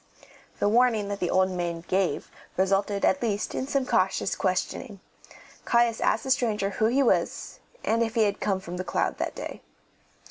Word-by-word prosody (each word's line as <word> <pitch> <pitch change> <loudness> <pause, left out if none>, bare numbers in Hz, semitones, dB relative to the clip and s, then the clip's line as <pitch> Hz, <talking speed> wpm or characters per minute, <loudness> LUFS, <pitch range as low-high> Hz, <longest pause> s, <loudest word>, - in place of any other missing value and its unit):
The - - +1
warning 225 -2 +3
that 200 -1 -3
the 175 - -1
old 185 0 +3
maid 175 -1 -3
gave 190 -1 0 0.3
resulted 195 +2 +1
at 280 - +2
least 210 -3 -1
in 260 - -3
some 275 -2 0
cautious - - +1
questioning. - - -2 0.6
Caius 235 -1 +2
asked 220 - +2
the 265 - -2
stranger 215 -6 +1
who 215 - 0
he 265 +4 +3
was, 245 - 0 0.2
and 230 +1 +1
if 225 -1 -1
he 225 - +4
had 205 -1 0
come 195 -2 0
from 180 -1 -7
The 185 - -3
Cloud - - -1
that - - -2
day. - - -7
205 Hz, 180 wpm, -26 LUFS, 190-235 Hz, 0.6 s, he